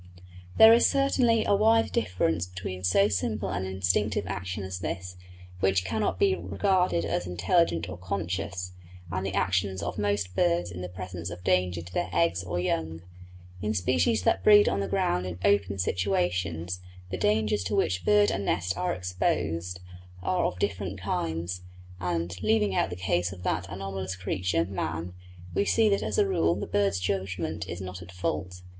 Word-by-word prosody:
There 220 0 +10
is 235 - +6
certainly 255 -5 +2
a - - +3
wide 225 +3 +4
difference 85 -2 0
between 90 0 -6
so 95 +2 +4
simple 100 0 -1
an 95 -1 -2
instinctive 95 +2 0
action 95 +1 -4
as 95 -1 -5
this, 90 0 -4 0.4
which 95 0 +2
cannot 105 -2 -1
be 95 +1 +3
regarded 100 - +1
as 90 +1 -1
intelligent 90 - +1
or 90 - -7
conscious, 90 0 -3 0.4
and 95 +2 -2
the 95 0 -3
actions 95 0 0
of - - -4
most 100 -3 -1
birds 85 0 +1
in 90 +1 -7
the 90 - -5
presence 90 -1 -6
of 90 0 -8
danger 90 -2 +1
to 90 +1 -12
their - - -1
eggs 85 +2 +1
or 90 -1 -3
young. 80 -2 -2 0.6
In 105 +1 -1
species 90 +2 +2
that - - +2
breed 205 -1 +7
on 100 - +1
the 100 - -1
ground 90 0 0
in 90 -1 -5
open 100 -1 +2
situations 90 -2 -1 0.3
the - - -1
dangers 105 +1 +1
to 100 - -1
which 90 -1 +1
bird 105 +2 +4
and 95 +1 -2
nest 90 0 0
are 90 +1 -1
exposed 90 -1 -2 0.4
are 185 -1 +1
of - - -5
different 95 0 -2
kinds, 85 -1 -2 0.4
and, 90 0 -2
leaving 105 -2 +2
out 95 - +1
the 90 - -5
case 90 -1 0
of 90 -2 -10
that 90 -1 -1
anomalous 95 0 -4
creature, 90 -2 -1
man, 85 -2 -4 0.4
we - - +2
see 220 +2 +3
that 200 - +2
as 105 -3 -2
a 100 - +4
rule 85 -3 +2
the 100 - -4
bird's 100 -2 +1
judgment 90 -3 -2
is 85 - -5
not 90 -1 -7
at 85 -1 -11
fault. 90 0 -3
90 Hz, 175 wpm, -28 LUFS, 90-100 Hz, 0.6 s, There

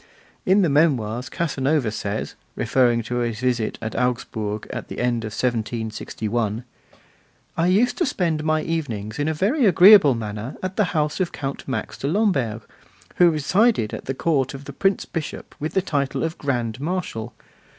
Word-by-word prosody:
In 190 +2 +5
the - - +3
Memoirs 130 -6 +1
Casanova 145 -6 0
says, 105 0 -4 0.2
referring 120 -3 +2
to 120 +2 -3
his 120 -2 -1
visit 120 -3 0
to 110 +2 -1
Augsburg 110 -4 -2
at - - -5
the - - -8
end 120 -2 0
of - - -3
1761: 110 -1 -2 0.9
I 165 +1 +2
used 210 +7 +2
to 345 - +2
spend 165 -9 -1
my 155 0 +1
evenings 115 -10 -3
in 145 - 0
a 160 - +1
very 225 - +2
agreeable 185 - +8
manner 110 +2 -5
at 185 0 -3
the 210 - +3
house 150 +2 0
of 185 -2 0
Count 135 -1 -5
Max 130 - -4
de 135 - -2
Lamberg, 140 - +1 0.5
who 175 -1 +7
resided 165 - +2
at - - -6
the 135 - -3
court 140 -3 0
of 135 +1 -10
the - - -8
Prince 195 0 +1
Bishop 165 -4 -6
with 155 +2 -4
the 190 - +2
title 140 -6 -1
of 165 +1 -3
Grand 120 -4 -2
Marshal. 155 -8 -4
135 Hz, 170 wpm, -23 LUFS, 115-170 Hz, 0.9 s, agreeable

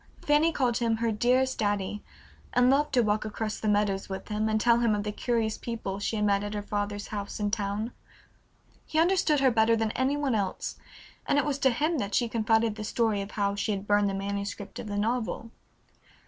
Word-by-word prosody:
Fanny 300 +3 +4
called 250 -6 +1
him 230 -2 +1
"her 230 0 0
dearest 255 +4 +2
daddy," 205 -1 -1 0.5
and 250 +1 +5
loved 295 +2 +2
to 245 - +5
walk 215 0 +1
across 215 0 -4
the 215 - -3
meadows 205 -2 +1
with 190 +3 -6
him, 215 +1 0
and 215 0 +1
tell 235 +1 +4
him 230 -3 +2
of 205 - -2
the 210 - -2
curious 225 0 -1
people 220 -4 -4
she 205 +2 -2
had 210 -1 +1
met 200 -1 +2
at 205 0 -4
her 205 - -3
father's 205 0 -3
house 205 0 -5
in 205 -1 0
town. 210 +2 -2 1.0
He 310 - -3
understood 330 -4 +3
her 265 -2 +5
better 225 0 +4
than 225 -1 0
any 265 +4 0
one 285 -3 0
else, 200 -4 -2 0.5
and - - +2
it 290 - +2
was 285 -2 -1
to 265 - +4
him 300 +6 0
that 200 -2 -2
she 240 - +2
confided 225 -1 +1
the 215 - -5
story 215 -1 0
of 195 - -6
how 200 -1 0
she 205 +1 -1
had 195 0 -4
burned 205 0 +3
the 195 - -2
manuscript 200 +1 -4
of 215 - -6
her 205 - -3
novel. 230 +1 -2
220 Hz, 220 wpm, -28 LUFS, 205-240 Hz, 1.0 s, and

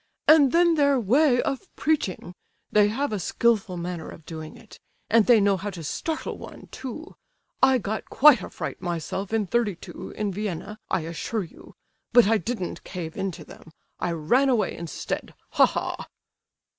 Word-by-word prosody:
"And 300 -4 +7
then 340 0 +4
their 285 -3 +3
way 245 +4 +3
of 275 +4 -3
preaching; 240 - -1 0.4
they 210 -1 +5
have 245 +4 -2
a 205 - -1
skilful 200 0 +1
manner 170 -1 -5
of 160 - -12
doing 160 -1 -8
it! 225 - -16 0.3
And 225 -1 +5
they 240 -3 +7
know 200 -1 +3
how 200 +3 -4
to 175 -4 -8
startle 315 - -4
one, - - -11
too. 270 +7 -8 0.5
I 265 -1 +6
got 215 -1 -4
quite 280 -6 +6
a - - -7
fright - - -6
myself 175 +3 -4
in 220 -2 +1
'32, 210 -3 -3
in 210 -2 -2
Vienna, 205 +1 -5
I - - +1
assure 170 +7 -3
you; 170 - -14 0.4
but 240 -3 +7
I 225 0 +3
didn't 190 -1 -4
cave 170 -4 -6
in 195 0 -2
to - - -10
them, 160 - -15 0.3
I 175 - -1
ran 240 - +2
away 240 -5 +1
instead, 165 -3 -5 0.2
ha, - - +5
ha!" - - -4
210 Hz, 170 wpm, -25 LUFS, 180-250 Hz, 0.5 s, And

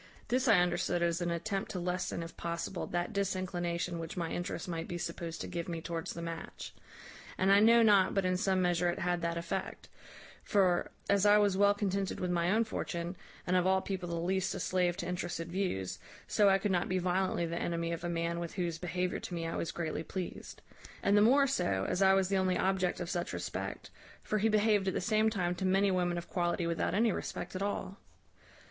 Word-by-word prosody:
This 255 +3 +1
I 225 - +7
understood 175 0 +1
as 170 +1 +1
an 175 - 0
attempt 195 +4 -2
to 185 - -4
lessen, 180 -1 -2
if 165 - -9
possible, 170 +2 -4
that 175 +4 -2
disinclination 180 -3 -2
which 165 +2 -6
my 170 -2 -2
interest 175 +1 -4
might 165 -2 -4
be 175 - -4
supposed 170 -1 -5
to - - -4
give 170 0 -4
me 165 -1 -3
towards 165 0 -4
the 170 - -6
match; 165 -1 -7 0.6
and 190 +1 +3
I 200 - +7
know 230 +2 +6
not 200 -3 +5
but 195 -1 +2
in 185 0 +2
some 185 0 +1
measure 175 0 +2
it 175 - -2
had 175 0 0
that 170 0 -1
effect; 180 +3 -4 0.5
for, 185 -4 +2 0.2
as 200 -1 +3
I 205 0 +7
was 205 -2 +3
well 200 +1 +4
contented 195 -1 -1
with 180 -1 -1
my 170 0 +1
own 220 +4 +3
fortune, 175 -5 -4 0.3
and 180 - +1
of 180 0 +3
all 190 0 +4
people 190 -2 -4
the 170 - -2
least 190 +3 0
a - - -4
slave 180 -1 +1
to 175 - -4
interested 175 -2 -3
views, 175 - -2 0.3
so 205 -1 +4
I 195 - +5
could 195 +1 -1
not 175 -1 +1
be 185 - +1
violently 185 -1 0
the 170 0 -3
enemy 170 0 -1
of 170 0 -4
a 175 - -2
man 170 0 -1
with 170 -1 -5
whose 170 -3 -2
behaviour 180 +1 -2
to - - -7
me 165 -1 -3
I 165 - -3
was 165 - -2
greatly 160 -2 -3
pleased; 180 +2 -6 0.4
and 200 - +4
the 205 - +6
more 270 +6 +6
so, 95 - 0
as 185 - -1
I 190 0 +6
was 190 -1 +2
the 195 +1 +1
only 185 -1 +2
object 190 -2 +1
of 175 - -3
such 175 -2 -2
respect; - - -5 0.3
for 215 - 0
he 220 +2 +3
behaved 210 -2 +3
at 190 - 0
the - - +1
same 215 +2 +2
time 180 -5 -1
to 180 - -5
many 195 +1 +3
women 175 -1 0
of 170 - -5
quality 175 -1 0
without 170 +2 -1
any 225 +2 +3
respect - - -5
at 185 - -3
all. 200 -1 -3
180 Hz, 225 wpm, -32 LUFS, 170-195 Hz, 0.6 s, I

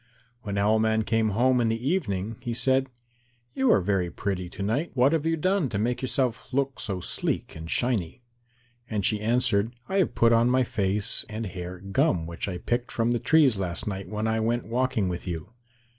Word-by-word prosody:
When 100 -5 -4
Owl 105 +2 +3
man 110 0 +2
came 110 0 +1
home 125 +4 +3
in 115 - +2
the 115 +3 -2
evening, 110 - -1
he 120 -2 -3
said, 130 +2 +2 0.6
"You 265 -1 +3
are - - +5
very 95 -2 0
pretty 90 -1 -3
to 100 - -6
night. 120 +11 0
What 130 +4 +4
have 160 -1 +1
you 165 0 +1
done 185 -2 +1
to 100 - -2
make 120 +4 -1
yourself 130 -1 -1
look 135 0 -1
so 95 -3 -3
sleek - - -3
and 80 +1 -8
shiny?" 120 -2 -1 0.7
And 105 -3 -1
she 105 -1 +1
answered, 115 -1 +1
"I 190 - -1
have 180 -11 +1
put 115 0 +4
on 115 +1 +4
my 130 +1 +3
face 100 -2 0
and 110 +1 -4
hair 90 -1 -6
gum 90 -3 +1
which 85 +3 -5
I 90 -3 -3
picked 120 +7 -2
from 115 0 +1
the 120 - +1
trees 145 -9 +4
last 90 -2 -2
night 95 -2 -4
when 105 0 -2
I 110 0 +1
went 115 +2 0
walking 120 -3 0
with 90 +1 -4
you." 85 +4 -5
110 Hz, 205 wpm, -26 LUFS, 100-125 Hz, 0.7 s, are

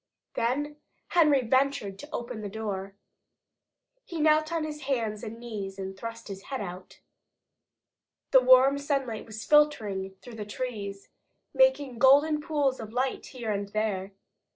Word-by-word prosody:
Then 290 +5 -1 0.3
Henry 300 -6 +4
ventured 260 -6 +1
to 290 - -9
open 235 -2 -5
the 205 - -5
door. 195 -2 -5 1.1
He 335 - -6
knelt 310 +1 +3
on 330 -2 0
his 300 -1 -5
hands 220 -5 -1
and 225 0 -6
knees 205 -5 -6
and 190 0 -5
thrust 230 +3 -7
his 195 -2 -7
head 265 -2 -4
out. 185 -2 -8 1.3
The 260 - +7
warm 260 +2 +6
sunlight 275 -7 -2
was 220 0 -7
filtering 210 -11 +2
through 240 -2 -10
the 210 - -4
trees, 205 -3 -5 0.4
making 290 - +3
golden 290 +4 +5
pools 290 -5 0
of 220 -1 -7
light 255 +2 -1
here 240 -4 -4
and 200 -1 -2
there. 200 -3 -1
240 Hz, 145 wpm, -28 LUFS, 205-280 Hz, 1.3 s, The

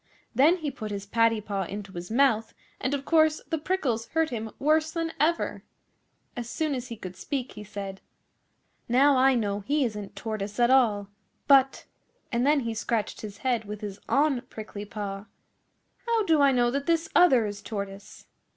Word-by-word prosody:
Then 285 +9 +5
he 305 -5 -3
put 220 -5 -6
his 200 -1 -5
paddy 230 +1 +2
paw 200 -2 -3
into 200 +2 -7
his 175 0 -7
mouth, 225 -2 +2 0.2
and 260 +3 0
of 275 -1 -6
course 315 -1 +4
the 320 - -1
prickles 270 -10 -1
hurt 320 -1 0
him 225 -2 -4
worse 310 +2 +2
than 330 0 -2
ever. 330 +3 +1 0.7
As 240 -1 -5
soon 310 +1 -1
as 250 -1 -4
he 230 -2 -7
could 185 -2 -8
speak 270 +1 -4
he 210 - -9
said, 200 -2 -7 0.9
'Now 275 +4 +5
I 260 0 +5
know 205 -3 0
he 280 +7 +1
isn't 210 -3 -5
Tortoise 215 -1 -5
at 240 +1 +4
all. 215 -7 +3 0.4
But' 270 -1 +4 0.5
and 240 +3 +1
then 295 -1 +4
he 230 -2 -3
scratched 225 -1 -2
his 205 -2 -8
head 240 -4 +1
with 210 0 -7
his 205 -1 -6
un 280 -3 +2
prickly 210 -1 -7
paw 200 -1 -5 0.8
'how 460 -2 +2
do 320 -4 +4
I 280 -1 +6
know 240 -2 +2
that 280 +2 -2
this 330 -1 +2
other 265 -11 +6
is 205 -1 -5
Tortoise? 200 -2 -7
240 Hz, 180 wpm, -27 LUFS, 210-285 Hz, 0.9 s, I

